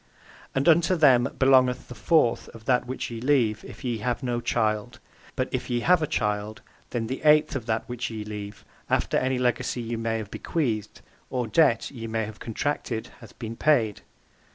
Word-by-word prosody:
And 135 +3 +1
unto 170 +2 +5
them 135 -6 +5
belongeth 130 -2 +4
the - - -8
fourth 120 +3 +2
of 110 -1 -13
that 125 -1 +2
which 130 -1 -4
ye 115 -1 -6
leave 125 -6 +2
if - - -11
ye 120 -3 -2
have 120 +4 -2
no 120 -1 -1
child, 110 0 -1 0.4
but 130 -1 0
if 130 0 -3
ye 120 -1 0
have 180 +5 +4
a 155 - 0
child 105 -6 -2 0.3
then 120 -2 -2
the 130 +4 -4
eighth 150 0 +4
of 120 -4 -4
that 110 0 -1
which 120 0 -4
ye 110 -2 -6
leave, 105 -1 -7 0.2
after - - +1
any 130 0 +1
legacy 125 0 0
ye 115 0 -3
may 115 0 -1
have 110 -2 -6
bequeathed, 110 -10 -2 0.3
or 125 -1 -1
debt 115 -1 +3
(ye 115 -4 -7
may 110 -1 -1
have 110 0 -10
contracted, 115 -1 -3
hath 115 -4 -14
been 115 -2 -6
paid). 115 -8 +2
120 Hz, 190 wpm, -26 LUFS, 110-130 Hz, 0.4 s, unto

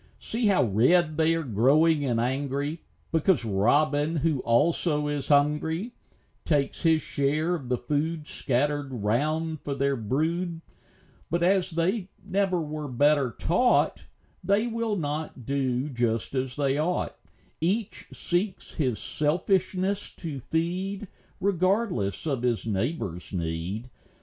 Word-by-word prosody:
See 230 0 -1
how 195 -2 +4
red 155 - +3
they 160 +1 +3
are 165 - -1
growing, 145 +7 +3
and 120 -3 +1
angry, 140 +5 -1 0.3
Because 160 -4 +2
robin, 145 +10 +2
who 155 -2 +1
also 150 +5 +2
is 145 -1 -2
hungry, 150 +8 +2 0.5
Takes 145 -4 0
his 160 -3 +3
share 150 +5 0
of 140 -8 -4
the 125 - +1
food 150 +5 -2
Scattered 145 +1 -1
round 150 +8 -1
for 140 - -3
their 140 0 +1
brood; 160 - -1 0.7
But 170 +1 0
as 185 0 +3
they 180 +4 -1 0.2
never 195 -2 +1
were 155 -1 -4
better 140 +1 +3
taught, 180 - +2 0.4
They 200 +3 +2
will 230 -2 -1
not 150 - -4
do 135 0 0
just 120 -4 -1
as 130 -1 -2
they 140 -1 +1
ought: 175 +4 -1 0.5
Each 195 +6 -1
seeks 180 +2 -2
his 130 -7 0
selfishness 185 +5 0
to 155 -6 -5
feed, 185 +5 -2 0.3
Regardless 185 - 0
of 135 -6 -1
his 120 -3 0
neighbor's 100 - -2
need. 85 +5 -3
150 Hz, 125 wpm, -27 LUFS, 130-175 Hz, 0.7 s, how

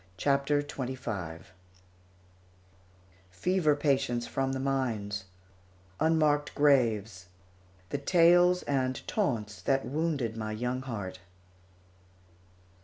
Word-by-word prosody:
CHAPTER 140 +4 +1
XXV 125 - -5 1.9
FEVER 155 - +1
PATIENTS 135 -5 0
FROM 135 +1 -1
THE 135 - -2
MINES 115 -7 -2 0.7
UNMARKED 155 -2 +2
GRAVES 115 - +2 0.6
THE 145 - -1
TALES 175 +3 +4
AND 130 -2 -1
TAUNTS 115 - -2
THAT 135 0 +1
WOUNDED 140 -4 -1
MY 110 -1 -4
YOUNG 125 +3 -2
HEART. 100 -8 -6
135 Hz, 85 wpm, -29 LUFS, 110-145 Hz, 1.9 s, TALES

